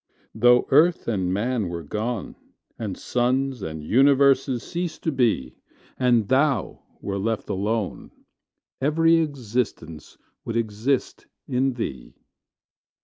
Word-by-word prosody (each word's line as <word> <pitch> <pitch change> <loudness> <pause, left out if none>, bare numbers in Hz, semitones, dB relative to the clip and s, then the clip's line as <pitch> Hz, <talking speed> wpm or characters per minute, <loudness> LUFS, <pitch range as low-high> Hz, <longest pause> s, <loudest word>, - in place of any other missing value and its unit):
Though 120 +2 +4
earth 160 +5 +4
and 95 -6 0
man 110 0 -1
were 85 -1 -5
gone, 110 +7 -4 0.4
And 105 -4 -4
suns 130 0 0
and 80 -3 -6
universes 135 - +3
ceased 175 -1 -5
to 160 - 0
be, 115 - 0 0.4
And 120 -4 +3
Thou 135 -4 +1 0.2
were 100 -1 -3
left 110 +2 -2
alone, 105 +1 -2 0.7
Every 165 +4 +4
existence 120 - -3 0.3
would 115 - -3
exist 115 +4 -2 0.2
in 130 +1 +1
Thee. 65 - -6
120 Hz, 110 wpm, -24 LUFS, 105-135 Hz, 0.7 s, Though